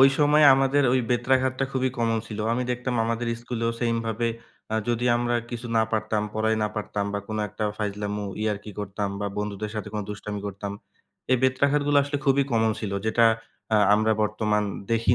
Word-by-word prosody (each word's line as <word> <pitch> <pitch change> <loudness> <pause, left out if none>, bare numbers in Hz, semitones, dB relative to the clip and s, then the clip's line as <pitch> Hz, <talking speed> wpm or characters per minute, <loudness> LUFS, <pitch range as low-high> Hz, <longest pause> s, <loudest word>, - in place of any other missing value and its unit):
ওই 135 - +9
সময়ে 150 +1 +5
আমাদের 135 +1 +3
ওই 130 - +3
বেত্রাঘাতটা 130 +2 +2
খুবই 130 -1 +1
কমন 115 -1 +1
ছিল। 110 - -7
আমি 125 +2 0
দেখতাম 125 0 -2
আমাদের 115 +1 -1 0.2
স্কুলেও 115 -1 -2
সেম 115 -1 +1
ভাবে, 115 +1 0 0.4
আ - - +1
যদি 120 0 0
আমরা 120 0 0 0.2
কিছু 120 0 -5
না 110 - +5
পারতাম, 110 -1 0
পড়াই 110 0 +1
না 105 - +1
পারতাম 105 -1 -2
বা 100 - -1
কোন 110 - -3
একটা 105 - -4
ফাইজলামো, 105 0 -3 0.2
ইয়ারকি 105 -1 -2
করতাম 100 0 -3
বা 100 - -1
বন্ধুদের 105 0 -3
সাথে 105 - -4
কোন 105 - -1
দুষ্টামি 105 0 -5
করতাম। 100 0 -5 0.6
এই 130 - +6
বেত্রাঘাতগুলো 140 +2 +2
আসলে 140 0 -2
খুবই 140 0 +4
কমন 110 -1 +3
ছিল, 100 -3 -3
যেটা 115 +1 +4 0.5
আ - - +6 0.2
আমরা 110 +1 +3
বর্তমান 105 0 +1 0.3
দেখি 115 +1 +3
115 Hz, 180 wpm, -25 LUFS, 105-125 Hz, 0.6 s, ওই